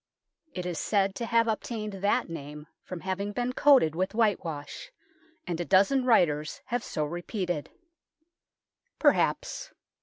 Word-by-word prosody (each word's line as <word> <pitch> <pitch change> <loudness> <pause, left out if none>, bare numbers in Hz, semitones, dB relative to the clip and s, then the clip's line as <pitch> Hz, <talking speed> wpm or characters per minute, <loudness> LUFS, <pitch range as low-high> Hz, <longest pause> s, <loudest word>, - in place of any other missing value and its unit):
It 180 -1 -4
is 175 -3 -3
said 195 -2 +1
to 235 +3 -4
have 230 0 +3
obtained 215 -1 -3
that 195 +1 +1
name 150 -2 -8 0.2
from 180 -2 -7
having 195 +2 -3
been 245 +2 -1
coated 265 - +5
with 185 +5 -2
whitewash, 205 - -1 0.5
and 175 -2 -3
a - - 0
dozen 200 +9 +3
writers 155 -10 +2
have 240 +1 -2
so 150 - -2
repeated. 175 0 -3 1.3
Perhaps. - - +1
195 Hz, 130 wpm, -28 LUFS, 170-230 Hz, 1.3 s, coated